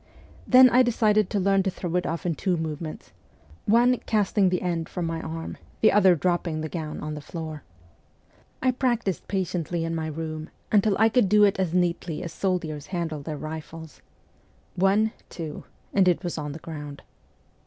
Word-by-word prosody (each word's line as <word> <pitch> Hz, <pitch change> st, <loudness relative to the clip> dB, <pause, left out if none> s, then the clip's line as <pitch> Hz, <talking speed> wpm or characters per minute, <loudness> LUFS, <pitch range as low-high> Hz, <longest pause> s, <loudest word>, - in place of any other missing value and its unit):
Then 255 Hz, 0 st, +8 dB
I 250 Hz, -, +6 dB
decided 215 Hz, -4 st, +3 dB
to 205 Hz, -, 0 dB
learn 195 Hz, +1 st, +3 dB
to 190 Hz, -, 0 dB
throw 175 Hz, -2 st, -4 dB
it 180 Hz, -, +1 dB
off 165 Hz, +3 st, -3 dB
in 175 Hz, -, +1 dB
two 180 Hz, +3 st, -1 dB
movements: 155 Hz, 0 st, -5 dB, 0.6 s
one, 240 Hz, +3 st, +4 dB
casting 205 Hz, -2 st, +2 dB
the 180 Hz, 0 st, -1 dB
end 170 Hz, -2 st, -2 dB
from 180 Hz, -, -3 dB
my 165 Hz, 0 st, -3 dB
arm, 165 Hz, 0 st, -6 dB, 0.2 s
the 220 Hz, -, +6 dB
other 190 Hz, -3 st, +5 dB
dropping 170 Hz, -1 st, -1 dB
the 155 Hz, -, -4 dB
gown 155 Hz, -2 st, -5 dB
on 150 Hz, 0 st, -4 dB
the 150 Hz, -, -6 dB
floor. 155 Hz, 0 st, -6 dB, 1.0 s
I 260 Hz, -, +4 dB
practised 240 Hz, -, -1 dB
patiently 175 Hz, -3 st, -2 dB
in 165 Hz, -, -2 dB
my 160 Hz, -1 st, -2 dB
room 155 Hz, 0 st, -5 dB, 0.2 s
until 205 Hz, -1 st, +4 dB
I 220 Hz, -, +5 dB
could 225 Hz, -3 st, +3 dB
do 210 Hz, +1 st, +6 dB
it 200 Hz, -1 st, +3 dB
as 180 Hz, -2 st, 0 dB
neatly 175 Hz, -2 st, 0 dB
as 170 Hz, -2 st, -6 dB
soldiers 165 Hz, -6 st, -2 dB
handle 165 Hz, -5 st, -3 dB
their 150 Hz, +1 st, -5 dB
rifles. 160 Hz, +1 st, -8 dB, 0.4 s
' -, -, -35 dB
One, 200 Hz, +4 st, +3 dB, 0.2 s
two,' 160 Hz, -3 st, -7 dB, 0.3 s
and 195 Hz, -2 st, +4 dB
it 180 Hz, +1 st, +2 dB
was 175 Hz, -, -3 dB
on 150 Hz, -2 st, -4 dB
the -, -, -7 dB
ground. 150 Hz, -3 st, -8 dB
175 Hz, 185 wpm, -25 LUFS, 160-200 Hz, 1.0 s, Then